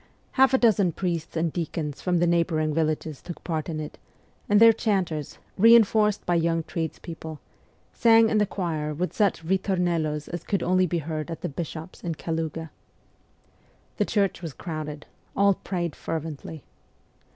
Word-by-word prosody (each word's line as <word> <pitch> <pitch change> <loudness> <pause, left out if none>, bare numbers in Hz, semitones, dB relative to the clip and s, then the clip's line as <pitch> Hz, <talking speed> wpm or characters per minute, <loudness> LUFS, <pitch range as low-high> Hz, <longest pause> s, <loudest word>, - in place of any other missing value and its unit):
Half 265 0 +4
a - - +5
dozen 205 -8 +3
priests 170 -2 -3
and 160 -1 0
deacons 155 -4 -3
from 180 -1 +1
the 170 - +3
neighbouring 165 -3 +1
villages 155 -2 -1
took 175 - -9
part 160 -1 -3
in 155 -2 -3
it, 150 - -7 0.5
and 205 0 +5
their 230 0 +8
chanters, 185 - -1 0.2
reinforced 215 -1 +5
by 175 - +1
young 165 -1 +1
tradespeople, 160 -1 -6 0.5
sang 225 -1 +5
in 220 -1 +2
the 210 - +2
choir 155 -6 -3
with 180 +4 -2
such 195 -6 +1
ritornellos 175 -5 0
as 175 -1 -5
could 195 -4 -1
only 185 +1 +3
be 175 - -1
heard 155 0 -4
at 165 - -6
the - - -2
bishop's 160 +3 -7
in 170 -2 -2
Kaluga. 160 0 -4 1.3
The - - +2
church 200 -4 0
was 165 -5 -6
crowded; 155 -2 -6 0.3
all 200 0 +5
prayed 175 -4 -4
fervently. 160 -1 -5
170 Hz, 155 wpm, -26 LUFS, 155-190 Hz, 1.3 s, their